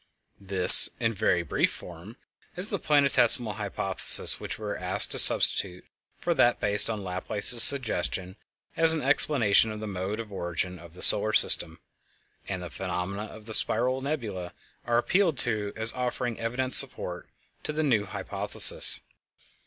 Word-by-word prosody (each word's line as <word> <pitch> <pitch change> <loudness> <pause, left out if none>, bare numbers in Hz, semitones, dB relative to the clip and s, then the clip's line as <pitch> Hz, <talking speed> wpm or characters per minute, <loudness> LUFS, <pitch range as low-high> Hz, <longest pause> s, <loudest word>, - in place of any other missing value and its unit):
This, 95 -2 +8
in 115 0 -4
very 95 -4 -4
brief - - -4
form, 90 +7 -15 0.4
is 185 +5 0
the 200 - -6
Planetesimal 125 -7 +1
Hypothesis - - +1
which - - -10
we - - -13
are - - -7
asked - - 0
to - - +2
substitute 90 -2 +4 0.3
for - - -5
that 120 - -2
based 105 +1 0
on 110 -3 -8
Laplace's 100 +5 +1
suggestion 95 -8 +2 0.4
as 165 0 +3
an 155 - -7
explanation 115 -6 -2
of 110 - -11
the 110 - -10
mode 100 +1 -8
of 110 -2 -11
origin 90 -1 -8
of 85 0 -19
the - - -5
solar 110 +1 +1
system; 80 -3 0 0.7
and 95 -2 -9
the 90 - -12
phenomena 95 +2 -8
of 110 0 -17
the 110 - -11
spiral 130 +4 -1
nebulæ 110 - -9 0.3
are 120 0 -2
appealed 170 +4 -3
to 105 -5 -4
as 110 +1 -2
offering 125 -1 -7
evident 125 +3 -7
support 90 -9 +3 0.3
to - - -9
the 155 +1 -6
new 115 -8 -3
hypothesis. - - -2
110 Hz, 155 wpm, -23 LUFS, 95-125 Hz, 0.7 s, This